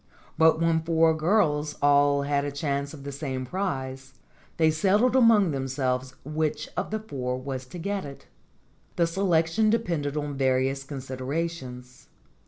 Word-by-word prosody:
But 160 0 +4
when 165 -1 +2
four 165 0 +3
girls 155 -4 +1
all 145 0 +4
had 140 0 0
a 145 - -3
chance 140 -1 -2
of 145 -3 -11
the 140 - -5
same 135 -2 -4
prize, 135 -6 -4 0.4
they 160 -1 +4
settled 205 +10 +2
among 225 -8 +5
themselves 130 -1 -2
which 155 +1 -2
of - - -2
the 220 - -1
four 125 -11 -4
was 130 -1 -5
to 145 - -9
get 200 +3 -3
it. 140 -1 -10 0.7
The 170 - +3
selection 170 +3 +2
depended 170 -10 -1
on 145 -1 -3
various 135 +1 +1
considerations. 130 -1 -5
145 Hz, 145 wpm, -26 LUFS, 135-165 Hz, 0.7 s, among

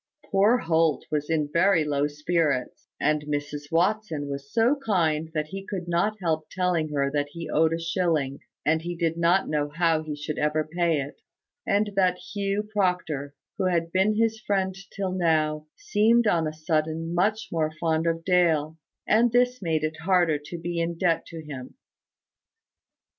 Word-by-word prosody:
Poor 205 +5 +4
Holt 165 - +1
was 150 0 -1
in 155 -2 +1
very 170 -1 +4
low 145 -1 0
spirits; 150 -2 -1
and 150 +1 +2
Mrs 145 0 -4
Watson 170 -4 0
was 140 0 -6
so 235 +5 +3
kind 160 - +1
that 155 0 -1
he 195 0 -6
could 190 -3 -5
not 175 +5 +1
help 160 -4 -1
telling 180 -4 0
her 140 -2 0
that 145 0 0
he 170 -1 -6
owed 160 +1 +3
a 165 - -1
shilling, 165 -5 0 0.3
and 160 +1 +2
he 175 +1 -4
did 165 -1 0
not 170 +3 +2
know 150 -1 -1
how 165 0 +1
he 155 -1 -5
should 150 +1 -5
ever 150 +1 +1
pay 165 0 0
it; 140 +1 -7 0.5
and 205 +1 +2
that 185 -2 +3 0.2
Hugh 200 +1 -1
Proctor, 180 -8 -1 0.2
who - - +1
had 170 -2 0
been 190 +4 +2
his 225 0 +1
friend 195 -4 0 0.2
till 195 -2 -3
now, 155 -4 +1
seemed 235 - +3
on 170 -6 +2
a - - -2
sudden 160 +1 -2
much 210 +5 0
more 160 -2 0
fond 160 0 +1
of 165 0 -1
Dale; 160 -4 +2 0.3
and 230 +2 +4
this 245 0 +2
made 160 -4 0
it 155 +1 -2
harder 175 -3 +2
to 175 - -6
be 170 0 -3
in 170 0 -2
debt 170 -2 +1
to 165 -2 -9
him. 135 -4 -8
165 Hz, 175 wpm, -26 LUFS, 155-185 Hz, 0.5 s, Poor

